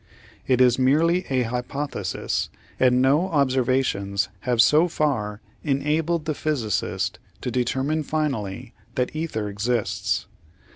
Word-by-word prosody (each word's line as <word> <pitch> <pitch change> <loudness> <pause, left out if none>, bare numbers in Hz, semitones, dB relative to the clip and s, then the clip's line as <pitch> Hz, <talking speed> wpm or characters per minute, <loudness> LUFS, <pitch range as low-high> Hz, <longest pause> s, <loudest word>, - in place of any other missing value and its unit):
It 130 -1 +3
is 125 0 +5
merely 165 +7 +3
a 130 -2 +2
hypothesis, 125 +5 -3 0.3
and 125 0 +4
no 145 +7 +3
observations 130 - +1 0.2
have 120 -2 +2
so 150 +9 +6
far 115 -11 -1 0.2
enabled 150 +3 0
the 155 - 0
physicist 135 - -1 0.2
to 125 - -3
determine 130 +5 0
finally 135 -11 -3 0.2
that 125 +3 -1
ether 155 -10 -2
exists. 105 +3 -1
130 Hz, 110 wpm, -24 LUFS, 120-150 Hz, 0.3 s, so